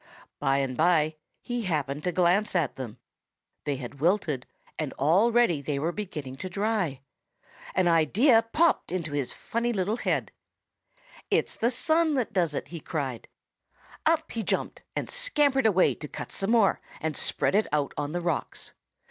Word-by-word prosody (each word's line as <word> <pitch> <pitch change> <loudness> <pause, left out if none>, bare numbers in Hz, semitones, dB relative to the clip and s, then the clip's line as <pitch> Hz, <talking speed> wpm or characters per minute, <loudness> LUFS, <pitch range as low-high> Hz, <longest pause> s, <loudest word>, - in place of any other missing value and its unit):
By 135 -1 +2
and 135 -2 -1
by 155 -1 +3 0.3
he 245 0 -2
happened 150 -6 -2
to 180 - +1
glance 185 +4 +2
at 165 -7 +1
them. 125 -5 -7 0.7
They 145 - 0
had 130 +1 -8
wilted 155 -6 +1 0.3
and 155 -3 -2
already 190 - +3
they 140 0 -2
were 160 +5 0
beginning 155 -10 -6
to 185 - -5
dry. 195 -8 -1 0.7
An 185 -1 +3
idea 200 - +5
popped 335 - +2
into 170 -4 -2
his 145 -3 -1
funny 235 +1 -2
little 205 +1 0
head. - - -1 1.0
"'It's - - +1
the 235 - +1
sun 315 +5 +2
that 245 -4 -1
does 170 -6 +1
it!' - - -4
he 170 - -6
cried. 140 -7 -4 0.8
"Up 320 0 +2
he 230 - -2
jumped 210 - -1
and - - -2
scampered 295 - +2
away 190 -3 +4
to 150 - -8
cut - - -7
some 195 - -1
more 225 -4 +3 0.2
and 160 -1 -2
spread - - +1
it 210 +2 +3
out 145 -1 0
on 145 0 -3
the 175 +2 -2
rocks. 170 -4 -3
175 Hz, 165 wpm, -27 LUFS, 145-225 Hz, 1.0 s, idea